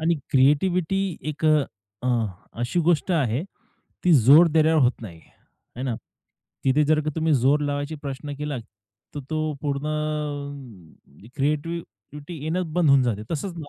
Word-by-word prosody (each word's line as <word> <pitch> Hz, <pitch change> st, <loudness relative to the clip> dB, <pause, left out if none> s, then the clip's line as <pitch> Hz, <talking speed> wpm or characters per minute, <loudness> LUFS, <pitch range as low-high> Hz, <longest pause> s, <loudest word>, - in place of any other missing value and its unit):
आणि 165 Hz, +2 st, +2 dB, 0.2 s
क्रिएटिव्हिटी 160 Hz, +7 st, +3 dB, 0.3 s
एक 155 Hz, +2 st, -7 dB, 0.6 s
अ, 125 Hz, -, +1 dB, 0.5 s
अशी 130 Hz, +9 st, 0 dB
गोष्ट 175 Hz, +2 st, +2 dB
आहे 135 Hz, -4 st, +1 dB, 0.6 s
ती 180 Hz, -, +5 dB
जोर 145 Hz, +6 st, +7 dB
देण्यावर 160 Hz, -1 st, +4 dB
होत 125 Hz, 0 st, +4 dB
नाही, 85 Hz, -7 st, -9 dB, 0.6 s
आहे 125 Hz, -, -5 dB
ना? 125 Hz, -, -1 dB, 0.7 s
तिथे 135 Hz, +3 st, +3 dB
जर 155 Hz, +1 st, +3 dB
का 155 Hz, -, 0 dB
तुम्ही 160 Hz, -1 st, +2 dB
जोर 135 Hz, +4 st, +3 dB
लावायचा 145 Hz, +1 st, -2 dB
प्रश्न 140 Hz, +1 st, -5 dB
केला 150 Hz, -3 st, -3 dB, 0.6 s
तर 145 Hz, -, -4 dB
तो 155 Hz, -1 st, -1 dB
पूर्ण 140 Hz, -1 st, -2 dB, 1.5 s
क्रिएटिव्हिटी 150 Hz, -, -4 dB
येणं 165 Hz, +1 st, -2 dB
बंद 175 Hz, -3 st, +3 dB
होऊन 140 Hz, -1 st, +6 dB
जाते, 110 Hz, -4 st, -1 dB
तसंच 170 Hz, +4 st, -3 dB
150 Hz, 135 wpm, -24 LUFS, 135-160 Hz, 1.5 s, जोर